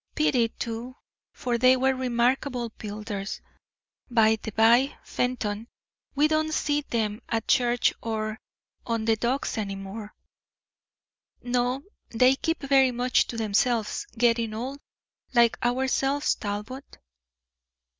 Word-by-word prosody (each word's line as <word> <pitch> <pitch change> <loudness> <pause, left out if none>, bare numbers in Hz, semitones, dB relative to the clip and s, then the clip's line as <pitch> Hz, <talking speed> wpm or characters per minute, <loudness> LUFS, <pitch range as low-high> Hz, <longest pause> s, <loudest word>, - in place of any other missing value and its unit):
Pity, 260 -6 +3
too, 235 +3 -6 0.4
for 240 -2 -2
they 255 +1 +6
were 265 +1 +2
remarkable 250 0 0
builders. 210 -1 -5 0.7
By 220 -2 +4
the - - -5
by, 235 +6 +4
Fenton, 230 -3 -2 0.5
we 295 +2 +4
don't 310 0 0
see 295 0 +1
them 220 -4 -2
at 225 -1 -1
church 245 -1 +3
or 215 -1 -3 0.4
on 230 -2 -2
the 225 0 +3
docks 240 +1 -1
any 195 -2 -3
more." 200 +2 -8 1.3
"No, 245 +2 0 0.3
they 250 +3 +4
keep 325 +3 -2
very 270 -1 +4
much 250 +1 +1
to 235 - -6
themselves; 225 - 0
getting 230 -2 +2
old, 260 +5 -5 0.6
like 235 -1 +5
ourselves, 265 +3 +1
Talbot." 210 +6 -6
240 Hz, 115 wpm, -26 LUFS, 220-260 Hz, 1.3 s, they